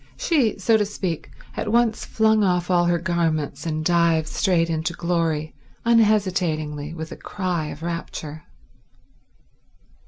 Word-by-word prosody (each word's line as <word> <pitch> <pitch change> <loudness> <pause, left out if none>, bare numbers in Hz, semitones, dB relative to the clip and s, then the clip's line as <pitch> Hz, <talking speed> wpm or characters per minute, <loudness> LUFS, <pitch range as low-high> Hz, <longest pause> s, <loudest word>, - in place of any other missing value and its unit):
She, 275 - +1
so 220 +3 +3
to 210 - +1
speak, 185 -5 -4 0.3
at 210 - -2
once 235 -1 +2
flung 220 -1 +3
off 180 -1 +1
all 175 -1 +4
her 175 0 +2
garments 165 -3 -1
and 155 -1 -2
dived 170 -2 +3
straight 165 0 +1
into 160 +1 -2
glory, 165 -3 -1 0.3
unhesitatingly, 180 -10 +1
with 160 -1 -6
a - - -6
cry 180 -5 -3
of 150 +1 -8
rapture. 160 -2 -5
170 Hz, 130 wpm, -23 LUFS, 160-200 Hz, 0.3 s, all